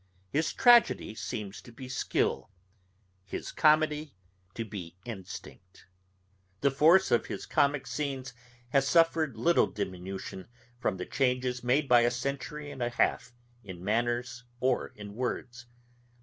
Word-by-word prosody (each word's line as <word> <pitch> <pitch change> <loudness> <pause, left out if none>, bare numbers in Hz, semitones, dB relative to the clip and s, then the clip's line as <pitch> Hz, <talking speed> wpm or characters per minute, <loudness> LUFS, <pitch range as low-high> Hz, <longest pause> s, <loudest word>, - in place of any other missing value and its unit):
His 155 +2 +1
tragedy 240 - +5
seems 105 -2 -5
to 120 - -14
be 130 +2 -9
skill, 130 - -1 0.7
his 95 - -6
comedy 155 -3 +2 0.4
to 115 - -3
be 90 -5 -8
instinct. 95 -3 -9 0.8
The 140 - +3
force 165 +8 +5
of 120 - +2
his - - -5
comick 140 -1 +1
scenes 135 -4 -4 0.4
has 135 +1 +2
suffered 165 -1 +3
little 170 +1 +4
diminution 95 -1 -6 0.3
from 95 - -1
the 90 - -4
changes 125 -2 0
made 135 +4 +2
by 125 -2 +7
a 120 - +4
century 140 +4 -4
and 135 -3 -8
a 120 - +1
half, 120 +1 0 0.3
in 90 -3 -9
manners 120 +3 -1 0.2
or 130 0 +1
in 105 -1 -9
words. 120 0 -4
125 Hz, 135 wpm, -30 LUFS, 110-145 Hz, 0.8 s, by